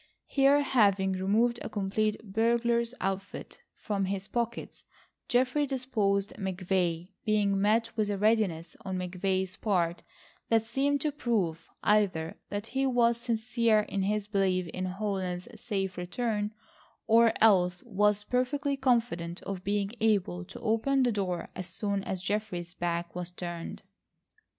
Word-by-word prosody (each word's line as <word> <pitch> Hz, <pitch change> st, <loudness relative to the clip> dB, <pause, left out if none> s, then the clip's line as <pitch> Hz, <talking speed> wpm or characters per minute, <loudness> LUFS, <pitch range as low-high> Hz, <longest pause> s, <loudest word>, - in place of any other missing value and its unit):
Here, 280 Hz, +1 st, +4 dB
having 200 Hz, -8 st, +3 dB
removed 215 Hz, +6 st, +2 dB
a -, -, -5 dB
complete 210 Hz, +1 st, 0 dB, 0.2 s
burglar's 235 Hz, +1 st, +2 dB
outfit 195 Hz, -, -4 dB, 0.2 s
from 200 Hz, -2 st, -2 dB
his 195 Hz, 0 st, -3 dB
pockets, 235 Hz, -1 st, -3 dB, 0.4 s
Geoffrey 255 Hz, +4 st, +2 dB
disposed 215 Hz, -7 st, 0 dB
McVay, 185 Hz, -2 st, -1 dB
being 205 Hz, -2 st, +2 dB
met 225 Hz, +3 st, +2 dB
with 215 Hz, -2 st, 0 dB
a 205 Hz, -, -1 dB
readiness 205 Hz, -6 st, +1 dB
on 190 Hz, -1 st, -3 dB
McVay's 185 Hz, +1 st, -1 dB
part 175 Hz, -5 st, 0 dB, 0.5 s
that 225 Hz, -1 st, +4 dB
seemed 275 Hz, +5 st, 0 dB
to 300 Hz, -, +1 dB
prove 205 Hz, -, -1 dB
either 190 Hz, -6 st, +2 dB
that 205 Hz, +1 st, -3 dB
he 270 Hz, +3 st, 0 dB
was 240 Hz, -2 st, +3 dB
sincere 230 Hz, -1 st, +2 dB
in 200 Hz, -1 st, -3 dB
his 205 Hz, +1 st, 0 dB
belief 190 Hz, -3 st, +1 dB
in 185 Hz, +2 st, -3 dB
Holland's 185 Hz, -1 st, -3 dB
safe 195 Hz, -5 st, -2 dB
return, 210 Hz, +2 st, -2 dB, 0.5 s
or 230 Hz, 0 st, +6 dB
else 180 Hz, -5 st, +4 dB
was 210 Hz, -2 st, +2 dB
perfectly 275 Hz, +5 st, 0 dB
confident 230 Hz, -10 st, 0 dB
of 190 Hz, -2 st, -5 dB
being 200 Hz, 0 st, 0 dB
able 200 Hz, -5 st, +1 dB
to -, -, -10 dB
open 235 Hz, +4 st, +2 dB
the 245 Hz, -, +3 dB
door 185 Hz, -5 st, -2 dB
as 185 Hz, -, -5 dB
soon 195 Hz, +2 st, -2 dB
as 185 Hz, -1 st, -3 dB
Geoffrey's 185 Hz, -4 st, -2 dB
back 170 Hz, -1 st, -2 dB
was 180 Hz, 0 st, -4 dB
turned. 175 Hz, -1 st, -6 dB
205 Hz, 135 wpm, -29 LUFS, 185-235 Hz, 0.5 s, or